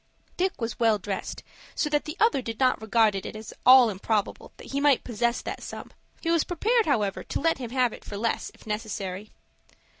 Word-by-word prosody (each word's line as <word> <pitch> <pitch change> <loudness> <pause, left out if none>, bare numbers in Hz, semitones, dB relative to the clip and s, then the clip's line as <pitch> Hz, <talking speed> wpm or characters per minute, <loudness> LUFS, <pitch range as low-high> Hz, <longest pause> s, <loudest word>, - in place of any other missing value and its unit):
Dick 375 +1 -1
was 230 0 -4
well 225 -2 +4
dressed, 200 -1 -5 0.3
so 305 - 0
that 295 -1 +1
the 310 +3 -6
other 440 - +3
did 230 -2 -6
not 255 -4 +2
regard 220 -1 +3
it 195 - -4
as 215 0 -8
at - - -16
all 255 -3 +8
improbable 205 +1 -2
that - - -11
he 280 +1 -1
might 285 -3 +4
possess 235 0 -1
that - - -5
sum. - - -8 0.3
He 330 - 0
was 335 -2 +3
prepared, 445 +7 +1
however, 210 -9 0
to - - -3
let 325 -1 +1
him 245 -3 -5
have 250 -1 +1
it - - -11
for 205 - -7
less, 230 +2 -1
if - - -19
necessary. 210 -2 -4
235 Hz, 210 wpm, -26 LUFS, 215-285 Hz, 0.3 s, all